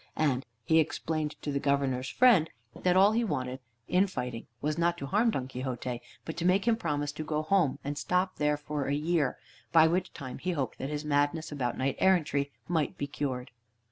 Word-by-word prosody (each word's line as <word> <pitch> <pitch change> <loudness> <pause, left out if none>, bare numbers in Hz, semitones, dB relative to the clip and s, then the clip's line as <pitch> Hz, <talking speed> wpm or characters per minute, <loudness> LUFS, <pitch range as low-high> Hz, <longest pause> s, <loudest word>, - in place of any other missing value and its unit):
And 135 -6 +1 0.2
he 160 0 +5
explained 155 -1 -1
to 145 - -2
the 140 - 0
Governor's 135 -2 0
friend 220 -11 +5 0.3
that 180 0 +2
all 195 +2 +7
he 230 +2 +1
wanted 130 - -2 0.3
in 185 +2 +3
fighting 125 -9 -5
was, 150 +4 -1
not 170 +1 +1
to 140 - -5
harm 210 - +2
Don 130 - -2
Quixote, 125 -1 -4 0.2
but 160 - -5
to 170 - -2
make 190 +4 +3
him 230 - +5
promise 145 -8 -2
to 155 +1 -5
go 155 0 -1
home, 165 -4 +2
and 145 +1 -3
stop 180 +3 0
there 150 0 +2
for 145 -1 -3
a 140 - +1
year, 150 -2 +1 0.3
by 160 +1 +7
which 180 +3 0
time 130 -2 -7
he 180 0 -1
hoped 140 -5 -3
that 135 - -3
his 150 0 -4
madness 145 +2 +1
about 130 -5 -2
knight 135 +1 0
errantry 150 -7 +2 0.2
might 160 -4 0
be 145 - -2
cured. 130 -3 -4
150 Hz, 205 wpm, -30 LUFS, 140-175 Hz, 0.3 s, all